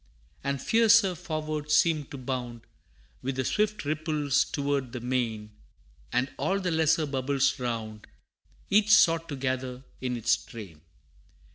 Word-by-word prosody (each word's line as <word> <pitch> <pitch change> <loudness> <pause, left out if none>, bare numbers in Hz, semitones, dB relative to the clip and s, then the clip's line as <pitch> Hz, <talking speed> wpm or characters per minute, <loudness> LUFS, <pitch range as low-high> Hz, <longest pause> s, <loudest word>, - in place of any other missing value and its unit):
And 140 0 -1
fiercer 225 - +4
forward 155 -3 -4
seemed 155 -1 +3
to 140 - -7
bound, 125 -2 -4 0.6
With 135 +1 -3
the 130 -1 -1
swift 210 - 0
ripples 150 -2 +1
toward 140 -3 -2
the 125 - -4
main; 115 -4 -2 0.6
And 125 +3 0
all 195 +1 +1
the 185 -2 -1
lesser 160 0 +2
bubbles 135 0 0
round, 110 -3 -4 0.6
Each 210 +1 +4
sought 165 -6 +5
to 145 - -3
gather 130 -1 -3 0.2
in 125 -1 -2
its 115 0 +3
train. 95 -9 -11
140 Hz, 135 wpm, -28 LUFS, 125-160 Hz, 0.6 s, sought